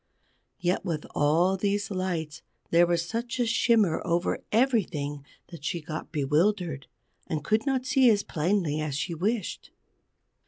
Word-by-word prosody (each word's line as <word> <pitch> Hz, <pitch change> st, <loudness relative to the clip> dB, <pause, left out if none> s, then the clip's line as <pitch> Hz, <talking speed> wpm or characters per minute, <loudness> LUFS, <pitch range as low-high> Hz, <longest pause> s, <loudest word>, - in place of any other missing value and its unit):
Yet 180 Hz, -1 st, 0 dB
with 165 Hz, -5 st, -3 dB
all 165 Hz, +6 st, +3 dB
these 205 Hz, +2 st, -1 dB
lights 175 Hz, -5 st, -3 dB, 0.3 s
there 170 Hz, +1 st, +5 dB
was 170 Hz, -1 st, +1 dB
such 235 Hz, +5 st, -3 dB
a 245 Hz, -, +3 dB
shimmer 225 Hz, -6 st, +3 dB
over 170 Hz, 0 st, 0 dB
everything 180 Hz, -, +1 dB, 0.3 s
that 170 Hz, -4 st, -11 dB
she 170 Hz, -, -2 dB
got 155 Hz, 0 st, -7 dB
bewildered, 155 Hz, 0 st, 0 dB, 0.4 s
and 155 Hz, -2 st, -3 dB
could 220 Hz, +5 st, +1 dB
not 260 Hz, -2 st, 0 dB
see 265 Hz, -1 st, +5 dB
as 205 Hz, -2 st, +3 dB
plainly 160 Hz, -2 st, 0 dB
as 150 Hz, -3 st, -3 dB
she 170 Hz, +5 st, -2 dB
wished. 200 Hz, +5 st, -2 dB
175 Hz, 145 wpm, -27 LUFS, 155-215 Hz, 0.4 s, there